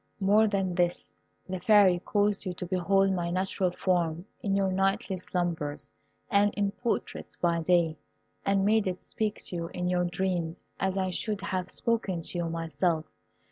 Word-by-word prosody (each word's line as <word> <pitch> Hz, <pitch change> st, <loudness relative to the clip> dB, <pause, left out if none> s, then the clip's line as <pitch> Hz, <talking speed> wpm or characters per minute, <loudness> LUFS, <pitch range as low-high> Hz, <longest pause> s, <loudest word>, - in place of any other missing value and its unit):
More 210 Hz, +3 st, +4 dB
than 195 Hz, -3 st, 0 dB
this, 175 Hz, 0 st, 0 dB, 0.3 s
the 185 Hz, -1 st, -3 dB
Fairy 195 Hz, -2 st, +5 dB
caused 205 Hz, +1 st, +1 dB
you 185 Hz, -2 st, -3 dB
to 180 Hz, -, -5 dB
behold 195 Hz, +2 st, +2 dB
my 175 Hz, -2 st, -1 dB
natural 185 Hz, +1 st, 0 dB
form 175 Hz, -2 st, 0 dB, 0.2 s
in 195 Hz, -1 st, 0 dB
your 195 Hz, -1 st, +2 dB
nightly 195 Hz, 0 st, +1 dB
slumbers, 160 Hz, -6 st, -3 dB, 0.4 s
and 205 Hz, 0 st, +3 dB
in 200 Hz, -1 st, +1 dB
portraits 235 Hz, +3 st, -3 dB
by 170 Hz, -1 st, +1 dB
day, 165 Hz, -2 st, +2 dB, 0.4 s
and 195 Hz, 0 st, +2 dB
made 215 Hz, 0 st, +3 dB
it 185 Hz, 0 st, -2 dB
speak 215 Hz, -1 st, -2 dB
to -, -, -4 dB
you 170 Hz, -1 st, -3 dB
in 180 Hz, +1 st, -3 dB
your 180 Hz, 0 st, +2 dB
dreams 175 Hz, -2 st, -2 dB
as 190 Hz, 0 st, 0 dB
I 190 Hz, -1 st, 0 dB
should 210 Hz, +2 st, -2 dB
have 185 Hz, -2 st, -2 dB
spoken 210 Hz, -7 st, 0 dB
to 175 Hz, -, -4 dB
you 170 Hz, -1 st, -1 dB
myself. 165 Hz, 0 st, -1 dB
185 Hz, 170 wpm, -28 LUFS, 175-195 Hz, 0.4 s, Fairy